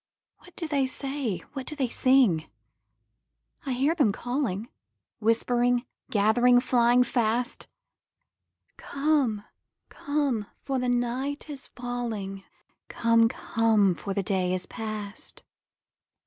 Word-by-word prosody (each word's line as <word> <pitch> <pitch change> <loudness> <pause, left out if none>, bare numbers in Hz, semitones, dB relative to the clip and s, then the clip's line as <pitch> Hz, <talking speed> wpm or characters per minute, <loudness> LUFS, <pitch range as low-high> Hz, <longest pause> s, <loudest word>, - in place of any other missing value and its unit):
What 360 - -18
do 330 - -4
they 280 -3 +1
say? 270 -6 -4
What 270 -2 -6
do 305 - -5
they 270 -4 0
sing? 240 -10 +3 1.2
I 265 - 0
hear 275 +6 +2
them 285 -11 +3
calling, 240 -3 -2 0.5
Whispering, 240 +2 +2 0.2
gathering, 240 +4 +4
flying 245 0 +4
fast, 240 0 -1 1.1
'Come, 275 -7 0 0.5
come, 280 -8 -1 0.2
for 270 -2 -1
the 250 0 0
night 245 +5 -1
is 275 -2 -7
falling; 230 -6 -5 0.4
Come, 230 0 +3
come, 220 -5 +2
for 195 +3 -5
the 200 - 0
day 185 -2 0
is 185 - -5
past!' 215 -2 -7
245 Hz, 110 wpm, -27 LUFS, 215-265 Hz, 1.2 s, gathering